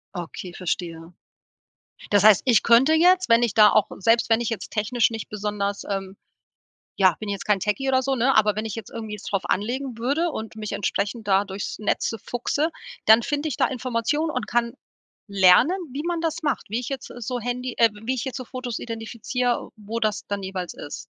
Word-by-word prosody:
Okay, 175 +1 -7
verstehe. 170 -2 -4 1.0
Das 205 -2 +4
heißt, 215 -4 +7
ich 235 -5 +5
könnte 240 +6 +5
jetzt, 360 +3 +4
wenn 230 +1 +5
ich 235 -4 +1
da 215 -1 +7
auch 215 - +3
selbst 230 +4 +2
wenn 225 +1 +4
ich 235 - -1
jetzt 225 - -5
technisch 230 +2 +1
nicht 225 -1 -6
besonders, 205 -1 -3
ähm, 195 -1 -4 0.8
ja 185 -4 +4
bin 215 - -6
ich 200 - -1
jetzt - - -7
kein 210 -2 +3
Techie 210 +8 -1
oder 260 -1 +3
so, 270 +1 0
ne, 260 +2 +2
aber 210 -1 +4
wenn 215 - -2
ich 220 - -4
jetzt 225 -4 -8
irgendwie 220 -2 -6
jetzt 210 - -10
es - - -6
drauf 195 -2 -1
anlegen 245 +4 -2
würde 285 +8 0
und 220 -7 -6
mich 215 -1 -5
entsprechend 215 +2 -2
da 195 +1 +4
durchs 195 0 -6
Netze 215 +2 -1
fuchse, 285 +6 -1 0.4
dann 220 +2 +7
finde 290 +3 -2
ich 270 - -4
da - - +3
Informationen 255 +5 -1
und 255 -5 -3
kann 235 -1 0 0.6
lernen, 200 - +5 0.2
wie 280 +3 -4
man 345 -1 -1
das 330 0 -2
macht, 295 -3 -2
wie 225 +3 -1
ich 250 - -6
jetzt 270 -3 -6
so 245 +1 -3
Handy, 245 +1 -3
äh 230 -1 +6
wie 255 +3 0
ich 255 - -3
jetzt 265 0 -5
so 255 - -6
Fotos 250 -2 -5
identifiziere, 235 +2 -3
wo 215 +2 -5
das 215 -2 -1
dann 200 -1 -3
jeweils 190 -2 -5
ist. 145 - -8
230 Hz, 210 wpm, -24 LUFS, 205-255 Hz, 1.0 s, heißt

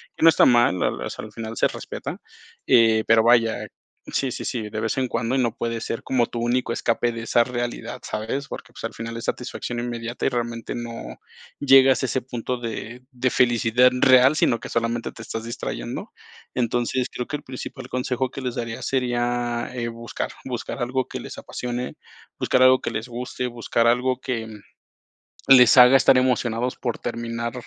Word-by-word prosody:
que - - -4
no 165 - +9
está 160 - +5
mal, 120 -7 +4
la - - +2
la - - -5
o - - -5
sea, - - -7
al 110 - -11
final 110 +1 -6
se - - +4
respeta, - - -6 0.5
eh, 110 -2 +5
pero 115 0 +5
vaya 115 -1 +3 0.4
sí, 135 -2 0
sí, - - -5
sí, 120 -3 -3
de 105 +1 -4
vez 110 - -1
en 130 -1 +1
cuando 115 0 -2
y 135 - +2
no 120 -3 0
puede 115 -1 -3
ser 115 0 -4
como 125 -3 +1
tu 120 - -6
único 120 0 0
escape 120 +1 0
de 115 - -5
esa 115 +1 +3
realidad, 120 -1 -4
¿sabes? 115 +6 -4
Porque, - - -9
pues, - - -11
al - - -4
final 115 0 -6
es 115 - -6
satisfacción 120 -1 -4
inmediata 120 0 -4
y - - +4
realmente 120 -1 -3
no 115 - -7 0.4
llegas 135 -1 +6
a - - +1
ese 130 - -1
punto 125 0 -4
de 115 +1 -6
de 130 0 0
felicidad 120 0 +4
real, 130 +1 +6
sino 115 -6 +2
que - - -8
solamente 115 0 -2
te - - -11
estás 115 0 -6
distrayendo. 115 - -5 0.4
Entonces, 120 +1 0
creo 125 - -4
que 150 - -3
el - - -16
principal 130 0 -8
consejo 125 0 -2
que 135 - -8
les 125 -2 -3
daría 115 -1 -4
sería, 120 -2 -1
eh, 120 -2 -3
buscar. 115 0 -5
Buscar 125 +1 -5
algo 130 +1 -1
que - - -6
les - - -9
apasione, 125 0 -5 0.4
buscar 130 - +1
algo 130 0 +6
que - - -3
les 110 +2 -4
guste, 125 +1 -4
buscar 115 -1 0
algo 125 +2 +2
que, 115 -4 -3
mm, 110 -1 -10 0.9
les 125 -1 +8
haga 125 +2 +9
estar 130 -1 +5
emocionados 125 -1 0
por 120 -3 -3
terminar 115 0 -4
120 Hz, 195 wpm, -23 LUFS, 115-125 Hz, 0.9 s, no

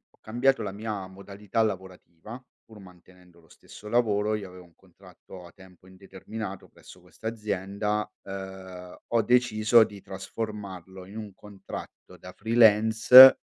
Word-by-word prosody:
ho - - -45
cambiato 120 +3 0
la 100 - -5
mia 105 -2 -6
modalità 100 +3 -5
lavorativa 95 +2 -7 0.2
pur 110 -2 -16
mantenendo 90 -1 -19
lo 80 - -26
stesso 105 - -14
lavoro. 110 -3 0
Io 100 -3 -7
avevo 90 0 -14
un 85 -1 -23
contratto 90 -1 -16
a - - -15
tempo 95 -1 -19
indeterminato 95 +2 -9
presso - - -17
questa 110 - -11
azienda, 105 -1 -3
uhm, 95 -2 -10
ho 115 -1 +1
deciso 120 -2 +3
di 100 -2 -9
trasformarlo 95 -2 -8
in 100 +3 -12
un 105 -3 -8
contratto 100 -1 -12
da - - -12
freelance, 115 +3 +7
100 Hz, 135 wpm, -26 LUFS, 95-110 Hz, 0.2 s, freelance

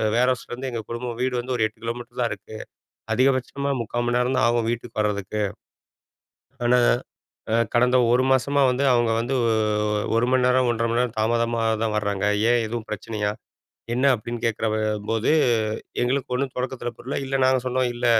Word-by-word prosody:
வேர்ஹவுஸ்லருந்து 125 +1 0
எங்க 115 -2 -3
குடும்பம், 120 0 -4
வீடு 130 0 0
வந்து 125 +1 -3
ஒரு 110 - +2
8 110 - -22
கிலோமீட்டர் 120 +1 -5
தான் 120 - 0
இருக்கு. 105 +2 -10 0.6
அதிகபட்சமாக 135 +2 +1
0:45 115 +1 -3
மணி 120 0 +2
நேரம் 125 +1 +1
தான் 130 - +4
ஆகும். 120 -1 +1
வீட்டுக்கு 120 -2 -5
வரதுக்கு. 105 0 -1 1.2
ஆனா, 125 +1 +4 0.7
அ - - +3 0.2
கடந்த 125 +1 +4 0.2
ஒரு 125 +1 +4
மாதமா 140 +2 +2
வந்து 130 +3 0
அவங்க 120 -1 +2
வந்து. 120 +4 -2 0.8
1 115 +2 +2
மணி 130 -1 +3
நேரம் 125 0 +3
1:30 115 0 -1
மணி 120 - +1
நேரம் 120 -3 -2
தாமதமா 115 +1 +1 0.2
தான் 110 -1 -1
வர்றாங்க. 100 -2 -2 0.3
ஏன் 120 -1 +3
எதுவும் 115 0 -5
பிரச்சனயா? 105 0 -2 0.6
என்ன 130 +3 +2
அப்டின்னு 120 +1 -6
கேட்குறபோது 110 -1 0 0.7
எங்களுக்கு 130 +1 -1
ஒண்ணும் 130 0 -1
தொடக்கத்துல 125 -1 -3
புரில. 125 +3 -4
இல்ல 135 0 -1
நாங்க 130 0 +4
சொன்னோம், 130 0 +1
இல்ல 120 +1 -2
120 Hz, 160 wpm, -24 LUFS, 115-125 Hz, 1.2 s, தான்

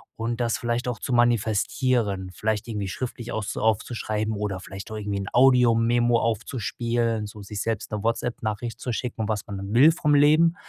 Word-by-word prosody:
und 115 +2 -3
das 115 -1 +1
vielleicht 120 +1 -2
auch 125 - -2
zu 130 - -3
manifestieren, 115 -3 +1
vielleicht 110 +3 -2
irgendwie 105 -4 -3
schriftlich 120 +3 -5
auszu 110 -2 -3
aufzuschreiben 110 0 -1
oder 100 -2 -3
vielleicht 95 +2 -9
auch - - -4
irgendwie 100 -1 -3
'n 100 - -5
Audiomemo 120 -2 +4
aufzuspielen, 115 -1 -1
so 105 0 -10
sich 100 0 -5
selbst 115 -2 -3
'ne 105 -1 -3
WhatsApp 115 +1 -1
Nachricht 110 +1 -4
zu 125 - -3
schicken, 115 -2 -3
was 105 -2 -2
man 100 - -6
dann 100 +1 -6
will 140 +7 +8
vom 150 -2 +1
Leben. 155 +4 +5
115 Hz, 180 wpm, -25 LUFS, 105-120 Hz, -, will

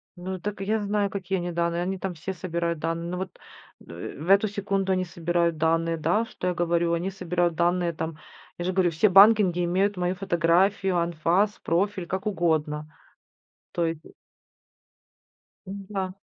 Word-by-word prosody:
Ну, 185 +1 -5
так 205 +1 -5
я 215 +2 0
знаю, 205 0 0
какие 190 -1 -2
они 175 0 -3
данные, 170 0 0
они 190 +2 -2
там 190 -2 -3
все 170 +4 -5
собирают 170 -2 -2
данные, 165 +2 -3
ну 180 - -3
вот, 185 0 -6 0.5
э, 85 +1 -7
В 160 +5 -6
эту 200 +2 +5
секунду 195 -1 -1
они 185 0 0
собирают 170 -1 0
данные, 165 +1 +1
да 175 +8 +1
что 180 - -5
я 180 - +1
говорю? 170 0 +1
Они 175 +3 -1
собирают 175 -2 -1
данные 175 +1 +1
там, 160 -1 -5 0.4
я 175 - -4
же 185 - 0
говорю, 180 -1 +3
все 165 +7 +3
банкинги 195 -2 +6
имеют 190 +4 +1
мою 180 +1 0
фотографию, 185 +1 +2
анфас, 170 +5 +1
профиль, 185 +1 0
как 190 +2 -3
угодно 155 -5 0 0.8
то 170 - 0
и 165 0 -2 1.7
М-да. 195 -1 -4
180 Hz, 160 wpm, -26 LUFS, 170-195 Hz, 1.7 s, банкинги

